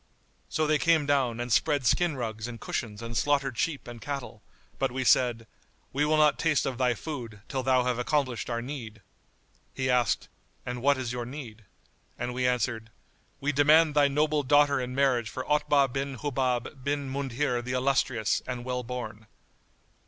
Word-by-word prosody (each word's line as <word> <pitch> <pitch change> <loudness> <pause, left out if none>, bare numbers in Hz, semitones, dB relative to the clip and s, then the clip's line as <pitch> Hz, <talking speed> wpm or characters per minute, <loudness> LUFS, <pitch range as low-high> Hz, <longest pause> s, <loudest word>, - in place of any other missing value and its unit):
So 155 - 0
they 155 0 +2
came 165 -3 +3
down 135 -5 +1
and 120 -1 -1
spread 145 0 +2
skin 170 +5 +2
rugs 110 -2 -4
and 120 -2 -8
cushions 110 -3 -4
and 115 0 -6
slaughtered 140 +1 +1
sheep 150 +1 -2
and 120 -1 -9
cattle; 135 -6 -5 0.4
but - - +1
we 130 +1 -2
said, 120 -2 +3 0.5
"We 145 +2 +2
will 155 +1 +2
not 150 -1 +4
taste 160 -4 +2
of 130 -2 -3
thy 125 -2 +2
food, 120 -8 -7
till 135 - -2
thou 130 0 +3
have 125 -1 -1
accomplished 130 -2 -1
our 115 -1 -2
need." 115 -6 -7 0.7
He 130 -1 0
asked, 120 -3 +1 0.4
"And 125 0 -4
what 140 +1 +3
is 125 -2 -3
your 120 -1 -4
need?"; 120 -6 -9 0.5
and 125 - -3
we 125 0 0
answered, 115 -2 -1 0.5
"We 145 +1 0
demand 150 +2 +5
thy 145 -1 +5
noble 150 +1 +1
daughter 145 0 +4
in 125 0 -4
marriage 130 -5 +2
for 130 +4 -5
Otbah 145 -3 +2
bin 135 0 -2
Hubab 130 -1 -2
bin 140 0 -1
Mundhir 135 -1 -1
the 125 +1 -4
illustrious 130 -4 +1
and 125 -1 -4
well 125 0 -2
born." 115 -3 -6
130 Hz, 175 wpm, -28 LUFS, 120-145 Hz, 0.7 s, demand